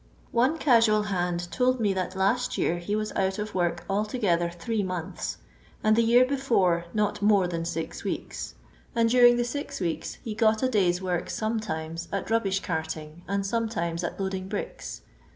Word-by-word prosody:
One 255 +7 +2
casual 230 -6 +4
band 175 -3 -2
told 255 0 +2
me 205 -3 +2
that 185 0 -3
last 230 +7 +1
year 175 - +1
he 205 +4 -2
was 215 0 -2
out 190 0 0
of 210 0 -4
work 175 -2 0
altogether 200 -4 +1
three 205 +6 -2
months, 180 -4 -4 0.5
and 215 0 +4
the 230 - +4
year 240 +2 +5
before 230 -11 +1
not 210 -1 0
more 205 -3 +4
than 165 -1 -3
six 165 -1 -4
weeks, - - -4 0.4
and 230 -1 +3
during 245 -1 +7
the 240 - +1
six 285 +4 -4
weeks 170 -3 -2
he 220 - -4
got 220 +1 +2
a 260 - +3
day's 185 -5 +2
work 180 -2 -1
sometimes 170 -7 -3
nt 200 +2 -3
rubbish 195 -4 +1
carting 160 -1 -4
and 200 +1 -1
sometimes 195 -6 -1
at 175 - -4
loading 190 -1 -2
bricks. 485 - -5
200 Hz, 170 wpm, -27 LUFS, 175-230 Hz, 0.5 s, during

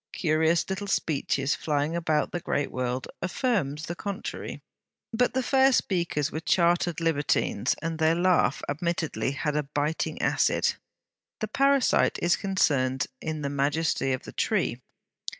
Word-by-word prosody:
Curious 160 0 +2
little 190 +1 -4
speeches 145 -5 0
flying 150 +1 -1
about 160 -3 0
the 175 - -2
great 145 -3 -2
world, 125 0 -2
affirmed 185 - 0
the 170 - -3
contrary. 200 +2 -6 0.5
But 245 +2 +1
the 260 - +1
fair 265 +1 +4
speakers 170 - 0
were 155 - -3
chartered 170 -1 +2
libertines, 160 -4 +1
and 165 0 -3
their 160 +1 +3
laugh 175 -6 +2
admittedly 160 -2 -1
had 150 +1 -2
a 150 - +2
biting 150 +2 -2
acid. - - +2 0.7
The 215 - -3
parasite 275 +2 +3
is 175 0 +3
concerned 140 -9 +1 0.2
in 155 -1 -4
the 140 - -1
majesty 145 0 0
of 130 - -2
the - - -9
tree. - - 0
160 Hz, 140 wpm, -27 LUFS, 145-185 Hz, 0.7 s, fair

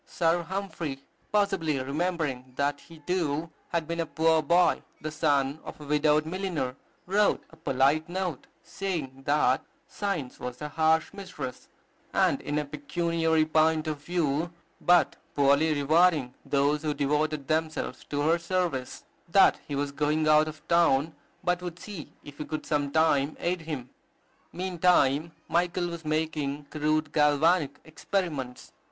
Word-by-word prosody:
Sir 170 0 +1
Humphry, 170 -6 -4 0.3
possibly 195 -8 +1
remembering 140 -3 -2
that 145 +1 0
he, 165 -2 -15
too, 165 -3 -1 0.2
had 165 -2 -1
been 170 0 -3
a 165 - +1
poor 160 0 +3
boy, 170 +4 +3 0.2
the 155 - -5
son 145 -2 +1
of - - -9
a 150 - -9
widowed 150 +1 +3
milliner, 165 -7 -2 0.3
wrote 205 +3 +2
a - - -15
polite 155 +1 +1
note, 180 -5 -3 0.2
saying, 155 -9 -4
that 145 -3 +3 0.2
"Science 185 -11 -3
was 125 0 -6
a 150 - -5
harsh 160 +2 +2
mistress, 190 -10 -7 0.5
and, - - +2
in 145 - -2
a 150 - 0
pecuniary 160 +2 0
point 155 0 +2
of 150 -2 -4
view, 165 -1 0 0.3
but 175 0 +4 0.2
poorly 140 +3 +4
rewarding 150 -2 +3
those 145 +1 +1
who 150 -1 -1
devoted 150 0 0
themselves 155 -4 -1
to 145 0 -2
her 165 +3 +3
service;" 170 -7 -2 0.3
that 195 +3 +5
he 145 - -3
was 140 0 -1
going 150 +2 0
out 155 0 +5
of 155 0 -9
town, 160 -3 +3 0.3
but 180 0 +1
would 175 -2 -6
see 185 -3 -8
if 145 0 -12
he 150 - -3
could 155 - -5
some 145 -2 0
time 155 -2 +2
aid 175 0 -1
him. 145 -6 -6 0.6
Meantime 170 -4 +2 0.2
Michael 175 +1 0
was 170 -1 -7
making 150 -2 -2
crude 155 0 0
galvanic 150 0 +3
experiments. 155 -5 -4
155 Hz, 145 wpm, -28 LUFS, 145-170 Hz, 0.6 s, that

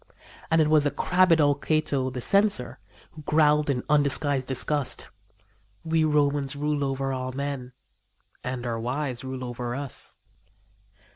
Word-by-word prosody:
And 160 - +3
it 155 - +3
was 155 -1 +4
the - - +3
crabbed 180 +1 +3
old 145 -1 +2
Cato, 155 -4 0
the 125 -1 -6
Censor, 200 - +2 0.3
who 155 - -12
growled 150 0 +3
in 125 -3 0
undisguised 145 -2 +2
disgust: 135 +2 -1 0.7
"We 160 -1 +1
Romans 145 -2 +1
rule 145 0 -1
over 135 0 -2
all 130 0 -4
men 135 -2 -4 0.7
and 125 -1 -4
our 115 -1 -2
wives 125 +1 -3
rule 130 -1 -5
over 120 0 -4
us." 140 -2 -5
140 Hz, 140 wpm, -26 LUFS, 130-150 Hz, 0.7 s, was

